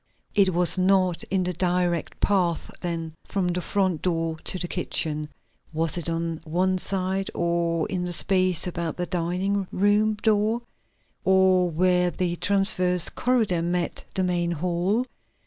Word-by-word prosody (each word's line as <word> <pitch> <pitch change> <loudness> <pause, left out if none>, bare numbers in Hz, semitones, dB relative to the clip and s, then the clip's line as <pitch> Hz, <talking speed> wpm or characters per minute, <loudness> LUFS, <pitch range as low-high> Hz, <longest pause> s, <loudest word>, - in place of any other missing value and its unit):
It 195 -3 +3
was 180 +1 +5
not 185 -2 +2
in 190 -1 -1
the 180 0 -1
direct 175 -1 -1
path 180 -5 0
then 165 -2 -4
from 190 -3 -2
the 180 +1 -2
front 185 -3 -1
door 165 -2 -1
to - - +4
the 175 - -3
kitchen. 155 -4 -2 0.4
Was 160 0 0
it 170 -1 -2
on 165 -1 -3
one 185 +3 0
side 190 0 -1
or 170 -1 0
in 180 -2 -3
the 175 - -4
space 185 0 +2
about 170 -3 -4
the 180 - -2
dining 185 +3 -1
room 210 +2 +2
door 215 +2 +1 0.6
or 190 -1 +3
where 180 +2 +2
the 175 +1 -2
transverse 185 -3 +3
corridor 225 -9 0
met 175 0 -2
the 190 - +1
main 175 -1 0
hall? 180 +8 0
180 Hz, 145 wpm, -25 LUFS, 170-190 Hz, 0.6 s, was